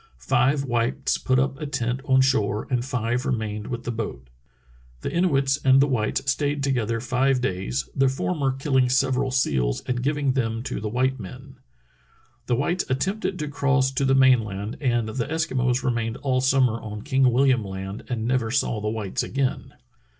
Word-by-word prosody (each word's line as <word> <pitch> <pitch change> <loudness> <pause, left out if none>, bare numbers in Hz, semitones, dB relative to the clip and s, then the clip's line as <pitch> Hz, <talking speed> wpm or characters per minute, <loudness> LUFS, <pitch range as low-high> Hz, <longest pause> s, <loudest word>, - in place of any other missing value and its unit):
Five 125 - +1
whites 120 0 0
put 130 -1 +1
up 135 +3 0
a 150 - -3
tent 125 -2 -2
on 130 -1 +4
shore 110 -6 +1
and 125 -2 +1
five 125 -1 -1
remained 105 -4 -3
with 120 -1 -5
the 120 - -3
boat. 105 - -5 0.7
The - - -3
Inuits 140 -6 +2
and 130 0 +6
the 140 - +5
whites 130 +1 0
stayed 145 +1 -1
together 115 -4 0
five 130 +3 +1
days, 90 - -2
the 135 -1 +3
former 135 +1 -1
killing 130 -1 +1
several 130 +1 +1
seals 65 - 0
and 125 -1 -3
giving 140 0 0
them 115 -3 -1
to - - -4
the 105 +1 -3
white 130 +3 0
men." 95 -4 -10 0.9
The 120 - +2
whites 170 +8 0
attempted 190 +8 -1
to 150 - -3
cross 140 -2 +1
to 135 +1 -1
the 135 0 +3
main 130 -3 +5
land, 105 +1 -5
and 120 -4 +1
the 120 +2 -3
Eskimos 130 -5 0
remained 115 -2 -1
all 130 -2 0
summer 130 -3 +2
on 105 -1 -7
King 135 -2 +2
Wilham 125 -1 +3
Land 95 +1 -6
and 115 -3 -2
never 125 -2 0
saw 115 -3 0
the 105 - -1
whites 105 -3 -2
again. 135 0 -2
130 Hz, 180 wpm, -24 LUFS, 115-135 Hz, 0.9 s, and